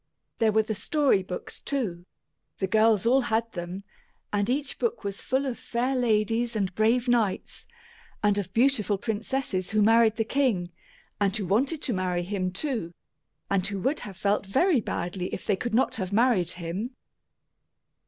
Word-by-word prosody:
There 225 Hz, -1 st, +4 dB
were 220 Hz, +1 st, +3 dB
the 220 Hz, -, -3 dB
story 275 Hz, -2 st, +2 dB
books, 185 Hz, -1 st, -7 dB
too. 190 Hz, -11 st, -3 dB, 0.5 s
The 195 Hz, -, 0 dB
girls 215 Hz, 0 st, +3 dB
all 260 Hz, +3 st, +5 dB
had 230 Hz, -1 st, 0 dB
them, 175 Hz, +2 st, -6 dB, 0.5 s
and 205 Hz, +1 st, +1 dB
each 275 Hz, +2 st, -1 dB
book 470 Hz, -1 st, -1 dB
was 200 Hz, -1 st, -4 dB
full 265 Hz, +2 st, 0 dB
of 255 Hz, -3 st, -3 dB
fair 250 Hz, +3 st, -1 dB
ladies 230 Hz, -1 st, +1 dB
and 195 Hz, -3 st, -1 dB
brave 230 Hz, +5 st, +2 dB
knights, 230 Hz, -5 st, 0 dB, 0.6 s
and 205 Hz, -1 st, +3 dB
of 190 Hz, -2 st, -5 dB
beautiful 225 Hz, -3 st, +2 dB
princesses 215 Hz, -2 st, -2 dB
who 215 Hz, -1 st, +3 dB
married 225 Hz, 0 st, +5 dB
the 225 Hz, -, +1 dB
king 220 Hz, -10 st, 0 dB, 0.5 s
and 200 Hz, +1 st, +1 dB
who 205 Hz, -, -3 dB
wanted 265 Hz, -, +1 dB
to 250 Hz, -, 0 dB
marry 180 Hz, -2 st, -1 dB
him, 185 Hz, 0 st, -2 dB
too, 195 Hz, -, -3 dB, 0.5 s
and 195 Hz, -1 st, +1 dB
who 200 Hz, -1 st, -3 dB
would 270 Hz, +8 st, +1 dB
have 195 Hz, -4 st, -8 dB
felt 200 Hz, 0 st, 0 dB
very 275 Hz, -, +3 dB
badly 180 Hz, -1 st, -3 dB
if -, -, -9 dB
they 205 Hz, -, +2 dB
could 225 Hz, +3 st, -3 dB
not 255 Hz, -, +2 dB
have 190 Hz, -3 st, -3 dB
married 210 Hz, -6 st, +3 dB
him! 185 Hz, +9 st, -5 dB
215 Hz, 170 wpm, -27 LUFS, 190-245 Hz, 0.6 s, all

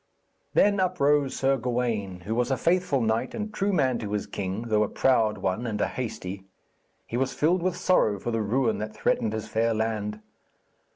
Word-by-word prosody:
Then 205 Hz, -1 st, +4 dB
uprose 150 Hz, -7 st, +2 dB
Sir 135 Hz, 0 st, +2 dB
Gawaine, 115 Hz, -7 st, -2 dB
who 105 Hz, +6 st, -3 dB
was 120 Hz, +2 st, 0 dB
a 135 Hz, -, +1 dB
faithful 170 Hz, -2 st, +1 dB
knight 110 Hz, 0 st, 0 dB
and 215 Hz, -1 st, -4 dB
true 205 Hz, 0 st, 0 dB
man 130 Hz, -9 st, +2 dB
to 105 Hz, -2 st, -4 dB
his 105 Hz, -, -1 dB
king, 100 Hz, +3 st, -4 dB
though 110 Hz, -2 st, +1 dB
a 105 Hz, -, +1 dB
proud 110 Hz, -5 st, +2 dB
one 95 Hz, +5 st, -2 dB
and 105 Hz, -2 st, -3 dB
a -, -, +2 dB
hasty. 100 Hz, -6 st, -5 dB, 0.6 s
He 120 Hz, -, -4 dB
was 135 Hz, +1 st, -1 dB
filled 170 Hz, +4 st, +2 dB
with 180 Hz, 0 st, -1 dB
sorrow 180 Hz, -, +3 dB
for 120 Hz, -, -3 dB
the 115 Hz, -1 st, 0 dB
ruin 115 Hz, +2 st, +1 dB
that 105 Hz, 0 st, -5 dB
threatened 110 Hz, -, +1 dB
his 110 Hz, -1 st, -4 dB
fair 115 Hz, 0 st, +1 dB
land. 110 Hz, -1 st, -2 dB
115 Hz, 190 wpm, -26 LUFS, 105-140 Hz, 0.6 s, Then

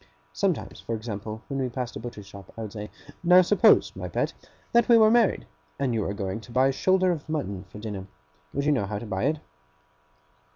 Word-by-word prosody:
Sometimes, 75 Hz, -, -1 dB
for 115 Hz, -, -3 dB
example, 110 Hz, 0 st, -6 dB
when 140 Hz, -1 st, -3 dB
we 130 Hz, -, -1 dB
passed 125 Hz, -1 st, -4 dB
a -, -, -4 dB
butcher's 115 Hz, -3 st, -8 dB
shop, 100 Hz, -1 st, -12 dB
I 115 Hz, -, -4 dB
would 105 Hz, -, -7 dB
say: 105 Hz, -1 st, -6 dB, 0.3 s
'Now 180 Hz, +1 st, +7 dB
suppose, 210 Hz, +4 st, +4 dB
my -, -, -5 dB
pet, -, -, -1 dB, 0.4 s
that 235 Hz, 0 st, +3 dB
we 235 Hz, -, +8 dB
were 220 Hz, -1 st, +6 dB
married, 235 Hz, -3 st, +3 dB, 0.3 s
and 135 Hz, -3 st, 0 dB
you 110 Hz, -, 0 dB
were 100 Hz, -, -2 dB
going 100 Hz, +1 st, -3 dB
to 120 Hz, -, -14 dB
buy 130 Hz, +3 st, +4 dB
a -, -, +2 dB
shoulder 185 Hz, +6 st, +2 dB
of 155 Hz, -2 st, -5 dB
mutton 100 Hz, -12 st, -3 dB
for 105 Hz, -, -11 dB
dinner, 105 Hz, -3 st, -6 dB, 0.4 s
would 140 Hz, +1 st, -2 dB
you 150 Hz, -, +4 dB
know 125 Hz, -9 st, +1 dB
how 105 Hz, +1 st, -3 dB
to 105 Hz, -, -6 dB
buy 95 Hz, -3 st, -2 dB
it? 155 Hz, -, +1 dB
120 Hz, 220 wpm, -26 LUFS, 105-155 Hz, 0.4 s, we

